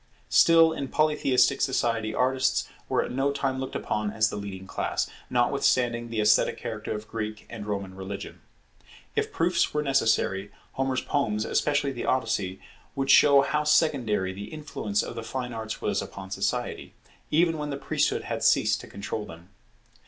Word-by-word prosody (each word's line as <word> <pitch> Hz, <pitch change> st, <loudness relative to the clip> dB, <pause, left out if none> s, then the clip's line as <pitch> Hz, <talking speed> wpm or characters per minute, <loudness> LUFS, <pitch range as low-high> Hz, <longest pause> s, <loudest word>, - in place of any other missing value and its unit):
Still 165 Hz, -1 st, +6 dB
in 140 Hz, -3 st, -4 dB
Polytheistic 150 Hz, -4 st, +2 dB
society 115 Hz, -5 st, 0 dB
artists 130 Hz, +2 st, +1 dB, 0.2 s
were -, -, +2 dB
at -, -, -6 dB
no 135 Hz, +2 st, +1 dB
time 135 Hz, -2 st, -1 dB
looked 130 Hz, -, -5 dB
upon 105 Hz, 0 st, -1 dB
as 110 Hz, 0 st, +1 dB
the -, -, -5 dB
leading 100 Hz, -2 st, -6 dB
class, -, -, -2 dB, 0.2 s
notwithstanding 120 Hz, -1 st, +1 dB
the 115 Hz, -1 st, -3 dB
esthetic 105 Hz, 0 st, +3 dB
character -, -, -4 dB
of 105 Hz, 0 st, -7 dB
Greek 110 Hz, -1 st, -5 dB
and 105 Hz, -3 st, -7 dB
Roman 100 Hz, -2 st, -3 dB
religion. 95 Hz, +1 st, -7 dB, 0.7 s
If -, -, 0 dB
proofs 170 Hz, -1 st, +1 dB
were 150 Hz, -, +1 dB
necessary, 110 Hz, -7 st, +1 dB, 0.2 s
Homer's 135 Hz, -1 st, -1 dB
poems, 110 Hz, -7 st, -1 dB
especially 145 Hz, -1 st, +1 dB
the 120 Hz, -, -5 dB
Odyssey, 110 Hz, -7 st, 0 dB, 0.4 s
would 135 Hz, 0 st, +1 dB
show 140 Hz, -1 st, +7 dB
how 150 Hz, +2 st, 0 dB
secondary 130 Hz, -, +2 dB
the 100 Hz, +2 st, -7 dB
influence 110 Hz, -9 st, -2 dB
of -, -, -6 dB
the 115 Hz, -, -5 dB
fine 125 Hz, +1 st, -4 dB
arts 110 Hz, -1 st, -5 dB
was 100 Hz, -1 st, 0 dB
upon 95 Hz, -1 st, -9 dB
society, -, -, -3 dB, 0.3 s
even 165 Hz, 0 st, +2 dB
when 150 Hz, 0 st, -3 dB
the 140 Hz, -, -3 dB
priesthood -, -, 0 dB
had -, -, -4 dB
ceased -, -, +3 dB
to -, -, -11 dB
control 105 Hz, +1 st, -5 dB
them. 85 Hz, +2 st, -12 dB
120 Hz, 165 wpm, -27 LUFS, 105-140 Hz, 0.7 s, show